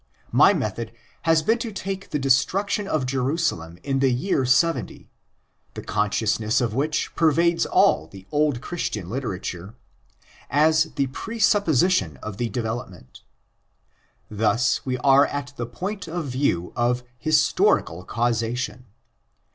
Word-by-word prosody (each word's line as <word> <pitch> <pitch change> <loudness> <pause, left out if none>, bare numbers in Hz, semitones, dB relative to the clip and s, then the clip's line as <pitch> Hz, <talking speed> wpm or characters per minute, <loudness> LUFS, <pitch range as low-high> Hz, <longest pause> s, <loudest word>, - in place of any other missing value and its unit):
My - - +6
method 115 -1 -3 0.3
has 165 -1 +3
been 225 +8 +2
to 230 -2 -4
take 195 0 -5
the - - -1
destruction 180 - +1
of 155 -7 0
Jerusalem 130 - -1
in 135 -1 -1
the 135 -1 +3
year 130 +2 0
70—the 165 +7 -3
conscious 105 +2 0
ness 110 0 +1
of 120 -3 -1
which 145 +5 -1
pervades 165 +1 +2
all 80 +2 +3
the 95 +1 -13
old 145 -4 +1
Christian 105 - -4
literature—as 125 - -2
the 140 - +1
pre 180 - -7
supposition 185 - +2
of 105 -2 -6
the 120 0 -2
development. 110 - -6 1.1
Thus 110 +4 +1
we 130 -1 -2
are 135 +2 +5
at 140 -1 -5
the 120 -3 -4
point 190 - -5
of 165 0 -4
view 125 -10 -1
of 125 0 0 0.2
historical 155 - +2
causation. 120 +3 -2
135 Hz, 125 wpm, -23 LUFS, 115-160 Hz, 1.1 s, My